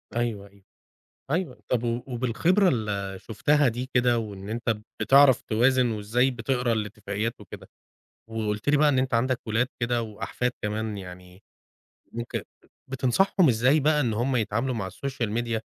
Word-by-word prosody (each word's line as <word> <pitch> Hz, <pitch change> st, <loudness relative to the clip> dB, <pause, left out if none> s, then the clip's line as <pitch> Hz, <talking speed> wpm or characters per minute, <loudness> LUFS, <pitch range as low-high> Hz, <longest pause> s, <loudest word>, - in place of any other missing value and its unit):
أيوه، 115 Hz, -4 st, -2 dB
أيوَه، 100 Hz, 0 st, -23 dB, 0.7 s
أيوَه. 165 Hz, -4 st, -2 dB
طب 120 Hz, -2 st, 0 dB
و 120 Hz, +1 st, -1 dB
وبالخبرة 135 Hz, -, +2 dB
اللي 100 Hz, -, -2 dB
شُفتها 135 Hz, +6 st, +2 dB
دي 125 Hz, +3 st, -4 dB
كده 125 Hz, -1 st, +3 dB
وإن 100 Hz, -3 st, -6 dB
أنتَ 115 Hz, 0 st, -1 dB, 0.2 s
بتعرف 135 Hz, -2 st, +6 dB
توازن 125 Hz, +2 st, +2 dB
وإزاي 115 Hz, +4 st, +1 dB
بتقرا 125 Hz, 0 st, -1 dB
الاتفاقيات 105 Hz, 0 st, -3 dB
وكده، -, -, -11 dB, 0.6 s
وقُلت 110 Hz, 0 st, -3 dB
لي 145 Hz, -, +5 dB
بقى 150 Hz, +1 st, +4 dB
إن 140 Hz, -3 st, +2 dB
أنتَ 130 Hz, -1 st, 0 dB
عندك 125 Hz, +2 st, +1 dB
ولاد 115 Hz, +3 st, +1 dB
كده 120 Hz, 0 st, 0 dB
وأحفاد 115 Hz, +3 st, -3 dB
كمان 105 Hz, 0 st, -2 dB
يعني 90 Hz, 0 st, -11 dB, 0.7 s
ممكن 120 Hz, 0 st, -4 dB, 0.5 s
بتنصحهم 155 Hz, +8 st, +2 dB
إزاي 130 Hz, +6 st, +3 dB
بقى 150 Hz, +1 st, +3 dB
إن 120 Hz, -6 st, 0 dB
هُم 125 Hz, +4 st, 0 dB
يتعاملوا 115 Hz, +3 st, -1 dB
مع 100 Hz, -4 st, -3 dB
السوشيال 120 Hz, +2 st, -4 dB
ميديا، 115 Hz, -1 st, -1 dB
120 Hz, 150 wpm, -26 LUFS, 110-130 Hz, 0.7 s, بتعرف